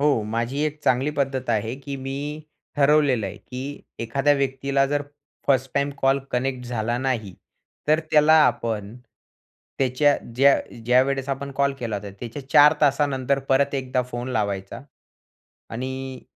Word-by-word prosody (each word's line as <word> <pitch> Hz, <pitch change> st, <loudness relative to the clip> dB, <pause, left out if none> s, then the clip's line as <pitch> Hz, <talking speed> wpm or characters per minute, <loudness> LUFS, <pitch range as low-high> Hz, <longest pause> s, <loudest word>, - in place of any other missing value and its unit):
हो. 140 Hz, -6 st, +3 dB
माझी 115 Hz, +6 st, -2 dB
एक 155 Hz, 0 st, -3 dB
चांगली 130 Hz, +4 st, +2 dB
पद्धत 135 Hz, -2 st, -1 dB
आहे 110 Hz, +2 st, 0 dB
की 140 Hz, 0 st, -7 dB
मी, 140 Hz, +3 st, -5 dB, 0.3 s
ठरवलेलं 140 Hz, -6 st, +3 dB
आहे, 95 Hz, +1 st, -7 dB
की 130 Hz, +5 st, -7 dB, 0.2 s
एखाद्या 135 Hz, +5 st, +2 dB
व्यक्तीला, 135 Hz, 0 st, 0 dB
जर 145 Hz, +1 st, -1 dB, 0.4 s
फर्स्ट 135 Hz, -1 st, +2 dB
टाईम 140 Hz, 0 st, +1 dB
कॉल 135 Hz, +1 st, +3 dB
कनेक्ट 125 Hz, 0 st, -2 dB
झाला 120 Hz, -1 st, -1 dB
नाही. 120 Hz, -7 st, -2 dB, 0.5 s
तर 155 Hz, +1 st, +4 dB
त्याला 150 Hz, +1 st, +5 dB
आपण, 110 Hz, -3 st, -1 dB, 0.8 s
त्याच्या 135 Hz, +2 st, +3 dB, 0.2 s
ज्या 140 Hz, +2 st, +6 dB, 0.3 s
ज्यावेळेस 130 Hz, +3 st, +2 dB
आपण 140 Hz, +1 st, -3 dB
कॉल 140 Hz, 0 st, +3 dB
केला 115 Hz, -4 st, -3 dB
होता, 100 Hz, 0 st, -7 dB
त्याच्या 130 Hz, +3 st, -7 dB
4 145 Hz, +1 st, +7 dB
तासानंतर 140 Hz, -2 st, +2 dB
परत 140 Hz, +1 st, +2 dB
एकदा 130 Hz, -1 st, -1 dB
फोन 120 Hz, +1 st, -4 dB
लावायचा. 100 Hz, -5 st, -2 dB, 0.9 s
आणि 130 Hz, +2 st, -5 dB
135 Hz, 140 wpm, -23 LUFS, 120-140 Hz, 0.9 s, 4